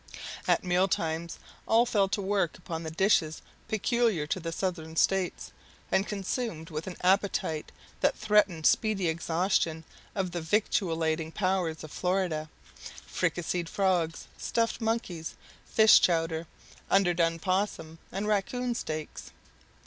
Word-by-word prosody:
At -, -, +3 dB
meal 180 Hz, +1 st, +2 dB
times 165 Hz, -1 st, -2 dB, 0.3 s
all 230 Hz, +2 st, +5 dB
fell 200 Hz, -5 st, +2 dB
to 200 Hz, +1 st, -1 dB
work 190 Hz, -4 st, 0 dB
upon 170 Hz, -2 st, -5 dB
the 160 Hz, -, -4 dB
dishes 160 Hz, -2 st, +2 dB, 0.2 s
peculiar 220 Hz, -, +1 dB
to 155 Hz, -, -2 dB
the 165 Hz, -1 st, -4 dB
Southern 165 Hz, -3 st, -3 dB
States, 190 Hz, +2 st, +1 dB, 0.4 s
and 195 Hz, -, +2 dB
consumed 195 Hz, -4 st, -3 dB
with 155 Hz, +2 st, -4 dB
an 185 Hz, -, -6 dB
appetite 185 Hz, -4 st, +1 dB, 0.3 s
that -, -, +2 dB
threatened 200 Hz, -7 st, +2 dB
speedy 210 Hz, -5 st, +3 dB
exhaustion 165 Hz, 0 st, 0 dB, 0.3 s
of 190 Hz, -3 st, -1 dB
the 175 Hz, 0 st, -3 dB
victualing 160 Hz, -3 st, 0 dB
powers 185 Hz, -5 st, -1 dB
of 155 Hz, -, -9 dB
Florida, 180 Hz, -4 st, -1 dB, 0.6 s
fricasseed 175 Hz, 0 st, -1 dB
frogs, 180 Hz, -5 st, 0 dB
stuffed 230 Hz, +1 st, 0 dB
monkey, 220 Hz, -7 st, -1 dB, 0.4 s
fish 220 Hz, -1 st, +7 dB
chowder, 165 Hz, -1 st, +1 dB, 0.4 s
underdone 175 Hz, -3 st, +3 dB
'possum, 185 Hz, -3 st, -2 dB
and 200 Hz, +2 st, -3 dB
raccoon 240 Hz, +4 st, 0 dB
steaks. 155 Hz, -9 st, -5 dB
180 Hz, 125 wpm, -29 LUFS, 160-200 Hz, 0.6 s, fish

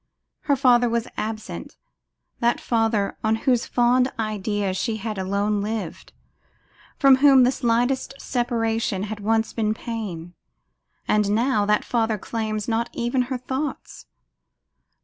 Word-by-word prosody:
Her 285 Hz, -, +3 dB
father 245 Hz, -3 st, +4 dB
was 235 Hz, 0 st, -1 dB
absent, 215 Hz, 0 st, -5 dB, 0.6 s
that 235 Hz, 0 st, +2 dB
father 225 Hz, -3 st, 0 dB
on 220 Hz, 0 st, +2 dB
whose 250 Hz, -3 st, +2 dB
fond 250 Hz, +2 st, +2 dB
idea 205 Hz, -2 st, -2 dB
she 220 Hz, +4 st, -2 dB
had 215 Hz, -1 st, -4 dB
alone 200 Hz, +2 st, 0 dB
lived; 215 Hz, +1 st, -5 dB, 0.9 s
from 270 Hz, -1 st, +6 dB
whom 270 Hz, -2 st, +6 dB
the 250 Hz, -, +4 dB
slightest 245 Hz, +2 st, 0 dB
separation 225 Hz, -5 st, -1 dB
had 215 Hz, 0 st, -5 dB
once 220 Hz, +2 st, 0 dB
been 215 Hz, -1 st, 0 dB
pain; 195 Hz, -8 st, -6 dB, 0.7 s
and 210 Hz, -1 st, +2 dB
now 215 Hz, -1 st, +1 dB
that 210 Hz, 0 st, +2 dB
father 225 Hz, -2 st, 0 dB
claims 215 Hz, 0 st, -3 dB
not 230 Hz, 0 st, 0 dB
even 240 Hz, +2 st, 0 dB
her 260 Hz, -, -1 dB
thoughts. 265 Hz, +3 st, -5 dB
225 Hz, 130 wpm, -23 LUFS, 210-245 Hz, 0.9 s, from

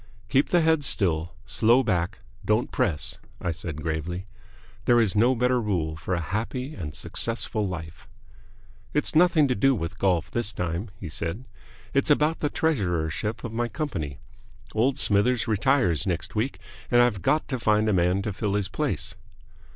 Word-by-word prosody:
"Keep 135 Hz, +1 st, +3 dB
the 175 Hz, -, +4 dB
head 160 Hz, -2 st, +3 dB
still 85 Hz, -, 0 dB
slow 115 Hz, +4 st, +4 dB
back 90 Hz, -6 st, 0 dB, 0.3 s
don't -, -, +1 dB
press," 75 Hz, -1 st, -1 dB, 0.2 s
I 90 Hz, -, -1 dB
said, 80 Hz, -2 st, -6 dB
gravely. 85 Hz, +3 st, -3 dB, 0.6 s
There 120 Hz, -1 st, +5 dB
is 110 Hz, -4 st, +2 dB
no 120 Hz, +5 st, +4 dB
better 125 Hz, +1 st, +2 dB
rule 85 Hz, -8 st, -1 dB
for 85 Hz, +3 st, -2 dB
a -, -, -1 dB
happy 115 Hz, -, -3 dB
and 75 Hz, -, -6 dB
successful 115 Hz, -2 st, -2 dB
life. 85 Hz, -3 st, -7 dB, 0.9 s
"It's -, -, +1 dB
nothing 165 Hz, -2 st, +5 dB
to 125 Hz, -, +1 dB
do 135 Hz, +5 st, +3 dB
with 85 Hz, -3 st, -5 dB
golf 90 Hz, -5 st, +1 dB
this 120 Hz, -2 st, -2 dB
time," 90 Hz, +2 st, -3 dB
he 90 Hz, -, -6 dB
said. 85 Hz, -, -4 dB, 0.5 s
"It's 140 Hz, +2 st, +2 dB
about 150 Hz, +2 st, +3 dB
the 150 Hz, -, 0 dB
treasurership 105 Hz, -, -1 dB
of 115 Hz, -, -5 dB
my 120 Hz, +1 st, 0 dB
company. 100 Hz, -, -4 dB, 0.6 s
Old 125 Hz, +5 st, +2 dB
Smithers 115 Hz, +4 st, +3 dB
retires 110 Hz, -, +2 dB
next 85 Hz, -1 st, -1 dB
week, 115 Hz, +6 st, -1 dB, 0.3 s
and 120 Hz, -, +4 dB
I've 120 Hz, -6 st, +3 dB
got 155 Hz, -, +1 dB
to 130 Hz, -3 st, -2 dB
find 110 Hz, -1 st, +2 dB
a 105 Hz, -, +2 dB
man 90 Hz, +2 st, +2 dB
to 105 Hz, -, -2 dB
fill 100 Hz, +1 st, -1 dB
his 105 Hz, -2 st, 0 dB
place." -, -, -2 dB
105 Hz, 165 wpm, -26 LUFS, 85-125 Hz, 0.9 s, There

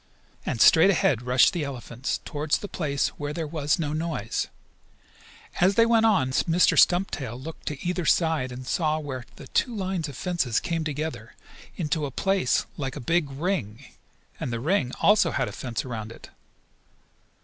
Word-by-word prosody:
And 115 Hz, -, -2 dB
straight 160 Hz, -, +7 dB
ahead 150 Hz, -, +2 dB
rushed 125 Hz, +5 st, +4 dB
the 170 Hz, -4 st, -2 dB
elephants, 130 Hz, -2 st, -4 dB
toward 150 Hz, +1 st, -5 dB
the 205 Hz, -, +1 dB
place 145 Hz, -7 st, -1 dB
where 145 Hz, 0 st, -3 dB
there 165 Hz, 0 st, -3 dB
was 150 Hz, -1 st, 0 dB
no 150 Hz, -3 st, -2 dB
noise. 155 Hz, -9 st, -2 dB, 1.1 s
As 185 Hz, +2 st, +4 dB
they 230 Hz, -, +6 dB
went 225 Hz, -1 st, +4 dB
on 135 Hz, -12 st, +2 dB
Mr. 170 Hz, +6 st, +3 dB
Stumptail 145 Hz, -, +2 dB
looked 160 Hz, +5 st, -9 dB
to 150 Hz, +3 st, -4 dB
either 180 Hz, 0 st, -1 dB
side 160 Hz, -7 st, +2 dB
and 125 Hz, +1 st, -8 dB
saw 155 Hz, +1 st, 0 dB
where 135 Hz, -5 st, -5 dB
the -, -, -11 dB
two 245 Hz, -, 0 dB
lines 185 Hz, -5 st, -2 dB
of 140 Hz, -, -9 dB
fence 170 Hz, -11 st, 0 dB
came 165 Hz, -2 st, -2 dB
together 145 Hz, -7 st, -5 dB, 0.4 s
into 155 Hz, -3 st, -1 dB
a -, -, -6 dB
place 195 Hz, +8 st, +1 dB
like 135 Hz, -4 st, -4 dB
a -, -, -5 dB
big 155 Hz, +3 st, +1 dB
ring, 135 Hz, -, -3 dB, 0.5 s
and 125 Hz, -, -3 dB
the 115 Hz, -, -2 dB
ring 140 Hz, -, +1 dB
also 205 Hz, -4 st, +5 dB
had 135 Hz, -4 st, -1 dB
a -, -, -5 dB
fence 120 Hz, -1 st, -4 dB
around 110 Hz, -3 st, -5 dB
it. -, -, -13 dB
150 Hz, 170 wpm, -26 LUFS, 130-175 Hz, 1.1 s, straight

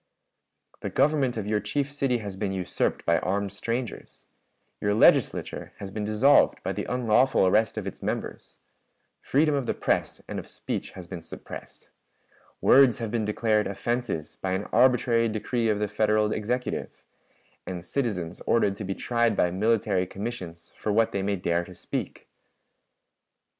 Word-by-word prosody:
"The -, -, -4 dB
government 140 Hz, -5 st, +2 dB
of 105 Hz, -, -3 dB
your 105 Hz, 0 st, +1 dB
chief 135 Hz, +8 st, -2 dB
city 135 Hz, -3 st, 0 dB
has 100 Hz, -2 st, -5 dB
been 100 Hz, 0 st, -2 dB
usurped 95 Hz, -2 st, -1 dB
by 85 Hz, 0 st, +3 dB
armed 100 Hz, +1 st, -1 dB
strangers; 115 Hz, +3 st, -5 dB, 0.5 s
your 105 Hz, 0 st, +1 dB
Legislature -, -, +3 dB
has 100 Hz, -1 st, -7 dB
been 105 Hz, +1 st, -3 dB
dissolved 110 Hz, +7 st, +4 dB
by -, -, -1 dB
the -, -, -4 dB
unlawful 125 Hz, -2 st, +3 dB
arrest 110 Hz, +4 st, +2 dB
of 105 Hz, -, -3 dB
its 100 Hz, -, -7 dB
members; -, -, -5 dB, 0.6 s
freedom 150 Hz, +2 st, +2 dB
of 135 Hz, -4 st, -1 dB
the -, -, 0 dB
press -, -, -1 dB
and -, -, -4 dB
of -, -, -9 dB
speech -, -, -5 dB
has 90 Hz, -, -9 dB
been 90 Hz, -1 st, -7 dB
suppressed; 80 Hz, -, -10 dB, 0.7 s
words 130 Hz, -3 st, +6 dB
have 115 Hz, -3 st, -4 dB
been 115 Hz, -2 st, 0 dB
declared 105 Hz, 0 st, +1 dB
offenses 100 Hz, -5 st, -3 dB
by 95 Hz, -1 st, -1 dB
an 95 Hz, +2 st, -1 dB
arbitrary 120 Hz, -2 st, +4 dB
decree 110 Hz, +2 st, -1 dB
of 105 Hz, -, +2 dB
the 105 Hz, 0 st, -1 dB
Federal 105 Hz, 0 st, +2 dB
Executive; 125 Hz, +4 st, -3 dB, 0.6 s
and 90 Hz, -2 st, -5 dB
citizens 90 Hz, -9 st, -2 dB
ordered 105 Hz, -4 st, +3 dB
to -, -, -5 dB
be 95 Hz, 0 st, -3 dB
tried 120 Hz, -2 st, +1 dB
by 90 Hz, -, +3 dB
military 100 Hz, -2 st, +1 dB
commissions 90 Hz, -6 st, -7 dB
for 105 Hz, -, -2 dB
what 110 Hz, +2 st, +3 dB
they 100 Hz, -, -1 dB
may 100 Hz, +1 st, 0 dB
dare 85 Hz, -1 st, 0 dB
to 90 Hz, +1 st, -12 dB
speak. -, -, -5 dB
105 Hz, 160 wpm, -26 LUFS, 95-120 Hz, 0.7 s, words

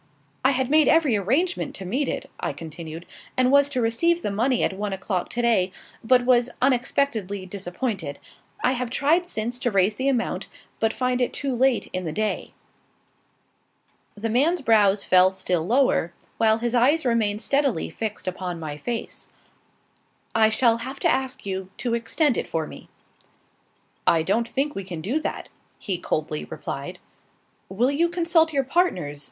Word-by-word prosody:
"I 260 Hz, -, +5 dB
had 260 Hz, -1 st, 0 dB
made 310 Hz, 0 st, +5 dB
every 310 Hz, -8 st, +4 dB
arrangement 270 Hz, -, 0 dB
to 190 Hz, -, -6 dB
meet 255 Hz, +10 st, -1 dB
it," -, -, -4 dB
I -, -, -2 dB
continued, 165 Hz, +1 st, -8 dB, 0.3 s
"and 255 Hz, 0 st, +3 dB
was 280 Hz, 0 st, +5 dB
to 255 Hz, -3 st, -1 dB
receive 335 Hz, +10 st, +1 dB
the -, -, -1 dB
money 240 Hz, +5 st, +1 dB
at -, -, +1 dB
one 200 Hz, +1 st, -3 dB
o'clock 190 Hz, -1 st, -2 dB
to 240 Hz, -, -2 dB
day, 195 Hz, -6 st, +2 dB, 0.3 s
but 245 Hz, +1 st, +4 dB
was 245 Hz, -1 st, +4 dB
unexpectedly 240 Hz, -6 st, 0 dB
disappointed. 185 Hz, -, -4 dB, 0.5 s
I -, -, +4 dB
have 250 Hz, -2 st, -2 dB
tried 315 Hz, +8 st, +2 dB
since 240 Hz, -5 st, -3 dB
to 245 Hz, -, 0 dB
raise 200 Hz, -1 st, +2 dB
the 265 Hz, +5 st, 0 dB
amount, 245 Hz, -4 st, -1 dB, 0.3 s
but 225 Hz, 0 st, +2 dB
find 250 Hz, +1 st, -1 dB
it 245 Hz, -, 0 dB
too 275 Hz, -3 st, -2 dB
late 260 Hz, 0 st, +2 dB
in 185 Hz, -1 st, -2 dB
the 160 Hz, -, -2 dB
day." 215 Hz, +5 st, -2 dB, 1.6 s
The 225 Hz, +2 st, -2 dB
man's 305 Hz, +8 st, +2 dB
brows 205 Hz, -4 st, +4 dB
fell 185 Hz, 0 st, +5 dB
still 180 Hz, -3 st, -1 dB
lower, 240 Hz, -8 st, +2 dB, 0.3 s
while 220 Hz, -1 st, +4 dB
his 235 Hz, +1 st, -2 dB
eyes 270 Hz, +6 st, +3 dB
remained 220 Hz, -3 st, +1 dB
steadily 275 Hz, -, +1 dB
fixed 215 Hz, +3 st, -5 dB
upon 180 Hz, -2 st, -4 dB
my 150 Hz, -2 st, -5 dB
face. 235 Hz, +8 st, -5 dB, 1.0 s
"I 220 Hz, -1 st, +5 dB
shall 230 Hz, +1 st, +3 dB
have 260 Hz, +4 st, -7 dB
to -, -, +3 dB
ask 265 Hz, -3 st, -2 dB
you 190 Hz, -1 st, -4 dB
to 240 Hz, -2 st, -2 dB
extend 235 Hz, +4 st, +1 dB
it -, -, -4 dB
for 160 Hz, -1 st, -2 dB
me." -, -, -12 dB, 1.2 s
"I 165 Hz, -1 st, +4 dB
don't 225 Hz, +7 st, 0 dB
think 285 Hz, +2 st, -1 dB
we 195 Hz, -, -5 dB
can 180 Hz, -3 st, -6 dB
do 245 Hz, -, -1 dB
that," 315 Hz, -, -5 dB, 0.3 s
he 185 Hz, -4 st, -3 dB
coldly 155 Hz, -, -2 dB
replied. -, -, -6 dB, 0.7 s
"Will 235 Hz, +8 st, +1 dB
you 335 Hz, +4 st, +2 dB
consult 335 Hz, -2 st, +2 dB
your 275 Hz, -2 st, +1 dB
partners?" 250 Hz, -, 0 dB
230 Hz, 170 wpm, -24 LUFS, 190-265 Hz, 1.6 s, I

